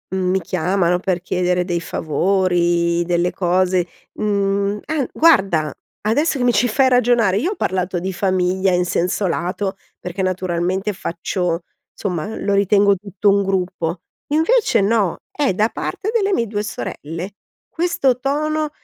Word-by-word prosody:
mhmm, 185 -1 0
mi 190 +1 +2
chiamano 180 +1 0
per 185 -1 -1
chiedere 180 0 0
dei 175 -2 -1
favori, 175 +1 +1
delle 175 0 0
cose, 180 0 +1 0.3
mhmm 200 0 0
ah, 300 -3 -1
guarda, 195 - +3 0.3
adesso 280 +7 +2
che 245 - 0
mi 245 - +3
ci 240 +5 +2
fai 260 +4 +3
ragionare 240 -5 +3
io 330 - 0
ho - - -4
parlato 185 -1 -1
di 190 +2 -3
famiglia 185 0 +1
in 180 0 +2
senso 180 +3 0
lato, 185 +3 -2 0.2
perché 180 +2 -5
naturalmente 185 +2 -1
faccio, 175 -1 -2 0.3
somma, 190 +1 -3
lo 200 - -1
ritengo 200 0 +4
tutto 200 +1 -3
un 200 0 +3
gruppo, 180 -3 -2 0.2
invece 325 +11 +2
no. 200 -3 +1
È 285 -9 0
da 210 +4 +2
parte 410 - -4
delle 405 -3 +1
mie 235 -11 +1
due 205 0 -2
sorelle, 175 -2 -6 0.3
questo 300 -7 0
tono 305 +3 -1
190 Hz, 145 wpm, -20 LUFS, 180-220 Hz, 0.3 s, ritengo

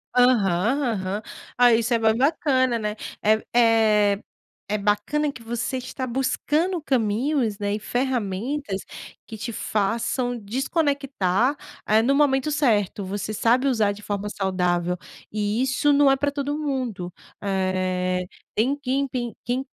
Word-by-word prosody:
Aham 240 0 +3
aham. 195 +1 -3 0.4
Ah, 245 -1 +6
isso 230 +1 +1
é - - +4
bem 220 -1 +3
bacana, 260 -2 +2
né, 210 -1 -3 0.3
eh 215 +1 +3
eh, 215 -3 +4 0.5
é 210 - +1
bacana 210 +9 0
que 250 - -12
você 240 +3 -3
está 255 +1 -5
buscando 285 +8 0
caminhos, 240 -1 0
né, 205 -1 -2
e 210 - -2
ferramentas 240 -1 -2 0.4
que 225 - -8
te 235 +3 -4
façam 230 +4 -1
desconectar, 265 - 0 0.3
eh, 215 +1 +4
no 270 +4 +3
momento 275 0 +2
certo, 215 -9 +1
você 200 +2 -4
sabe 235 +5 +2
usar 220 -6 +2
de 205 +1 -9
forma 205 0 -3
saudável 180 -3 0 0.3
e 210 +3 0
isso 265 +3 +2
não 285 -1 +5
é - - +4
pra 285 +2 0
todo 285 0 -2
mundo, 250 -11 -3 0.3
eh, 185 -2 -1 0.3
tem 250 +6 +1
quem 275 0 0
tem 245 -3 -4
quem 250 +2 -2
230 Hz, 140 wpm, -24 LUFS, 205-265 Hz, 0.5 s, Ah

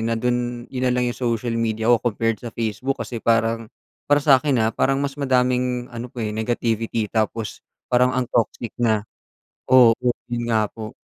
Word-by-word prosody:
na 115 - +1
dun 120 0 -1
yun 130 -1 -2
nalang 125 0 +1
yung 120 - -3
social 115 -1 -1
media 110 -1 -1
ko - - +1
compared 115 -2 0
sa 120 - -5
Facebook 115 +4 -2
kasi 120 - -4
parang, 115 -1 +1 0.4
para 145 - +6
sakin, 135 -4 +4
ah, - - +1
parang 135 0 +1
mas 140 -1 -2
madaming 125 -2 +1
ano 120 +1 -5
po, 125 - -11
eh, 105 - -2
negativity 115 -1 -1
tapos 110 -1 -2 0.3
parang 125 +1 +4
ang 130 -1 0
toxic 115 0 0
na. 110 -3 +2 0.7
Oo 125 -3 +7 0.4
yun 120 -1 -2
nga 110 -2 +2
po. 110 -1 -8
120 Hz, 175 wpm, -22 LUFS, 115-125 Hz, 0.7 s, Oo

